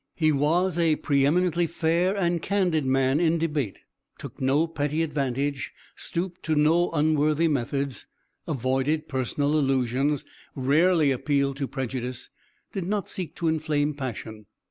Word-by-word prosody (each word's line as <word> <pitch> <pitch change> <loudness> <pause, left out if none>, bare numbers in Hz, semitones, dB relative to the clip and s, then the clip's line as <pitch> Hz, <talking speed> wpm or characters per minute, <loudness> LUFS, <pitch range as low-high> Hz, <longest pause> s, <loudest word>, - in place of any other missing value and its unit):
He 155 -2 +3
was 165 +5 +1
a 165 -2 +3
pre 140 -2 +2
eminently 175 +1 +2
fair 170 +4 +1
and 175 -3 +1
candid 180 -8 +1
man 135 +2 +2
in 170 -1 +2
debate, 150 - -2 0.4
took - - -10
no 135 +5 +3
petty 155 -1 -1
advantage, 140 -2 -2 0.2
stooped 175 +1 -4
to 155 - 0
no 160 +4 +3
unworthy 155 0 +2
methods, 140 -3 -2 0.4
avoided 135 +3 0
personal 140 +2 -1
allusions, 135 +1 +1 0.3
rarely 150 +3 +3
appealed 140 +1 0
to 140 -1 -2
prejudice, 130 -1 -4 0.4
did 190 -4 -4
not 205 -1 -2
seek 180 -4 -4
to 170 - -2
inflame 150 -2 0
passion. 110 -6 -6
150 Hz, 135 wpm, -26 LUFS, 135-165 Hz, 0.4 s, He